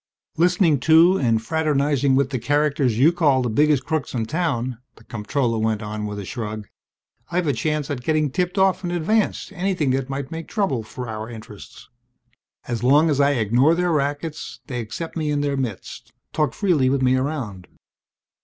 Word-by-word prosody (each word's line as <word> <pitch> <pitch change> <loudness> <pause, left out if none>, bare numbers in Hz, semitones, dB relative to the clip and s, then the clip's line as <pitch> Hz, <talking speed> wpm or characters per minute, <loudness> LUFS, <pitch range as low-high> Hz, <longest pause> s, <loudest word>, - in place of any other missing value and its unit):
"Listening 170 -3 +3
to 165 +7 +5
and 115 -4 +2
fraternizing 140 0 +1
with 140 0 +1
the 130 - -1
characters 145 -2 +1
you 145 +7 +5
call 145 -7 +2
the 120 - -1
biggest 145 +1 +2
crooks 155 -4 -2
in 115 -2 -1
town," 130 -5 -2 0.2
the 115 - -19
comptroller 115 +2 -2
went 110 0 -1
on 105 0 -4
with 105 0 -5
a 100 - -6
shrug, 110 -2 -5 0.6
"I've 175 0 0
a 145 - +1
chance 150 +4 -1
at 130 -3 -3
getting 155 +1 0
tipped 180 +4 -1
off 190 -1 +2
in 175 - -2
advance 175 +6 0
to 200 - -16
anything 180 -7 0
that 135 0 -1
may 135 +1 -3
make 165 0 -6
trouble 190 - -1
for 125 +3 -8
our 110 0 -6
interests. 110 -3 -11 0.8
As 120 -3 -3
long 145 +6 +4
as 145 -1 +2
I 140 +1 +4
ignore 125 +6 +3
their 180 0 0
rackets 150 +1 -3
they 125 -3 -4
accept 120 +9 -6
me 155 -2 -1
in 145 -1 0
their 145 -1 0
midst, 125 -8 -5 0.2
talk 150 -1 0
freely 165 -11 +2
with 135 0 0
me 130 0 +4
around. 130 - -3
140 Hz, 185 wpm, -22 LUFS, 120-160 Hz, 0.8 s, to